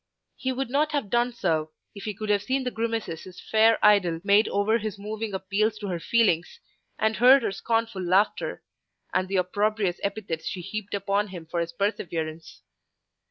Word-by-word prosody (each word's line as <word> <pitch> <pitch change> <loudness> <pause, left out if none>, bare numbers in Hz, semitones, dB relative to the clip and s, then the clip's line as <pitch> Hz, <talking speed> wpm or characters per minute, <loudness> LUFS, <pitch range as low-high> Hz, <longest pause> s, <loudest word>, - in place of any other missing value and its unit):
He 260 - -2
would 260 -1 -3
not 300 +2 +1
have 275 -9 -2
done 240 +1 +2
so 160 -9 -1 0.2
if 200 - -9
he 210 -2 -3
could 215 +1 -5
have 205 -1 +3
seen 260 +5 -1
the 250 - -2
grimaces 225 -8 -3
his 185 -1 -11
fair 220 +1 +4
idol 185 -6 +4
made 200 +2 +4
over 210 +3 +1
his 215 -1 -4
moving 215 +2 -4
appeals 200 +3 0
to 210 - -7
her 175 -2 -2
feelings, 195 - +1 0.4
and 220 0 +1
heard 255 +2 +7
her - - 0
scornful 225 0 -1
laughter, 185 +4 +1 0.5
and 185 0 +1
the 195 - -3
opprobrious 200 0 0
epithets 195 -6 -3
she 185 - -4
heaped 205 +3 -5
upon 200 +1 0
him 180 -4 -9
for 170 +2 -3
his 170 0 -2
perseverance. 170 -5 -3
205 Hz, 180 wpm, -26 LUFS, 185-225 Hz, 0.5 s, heard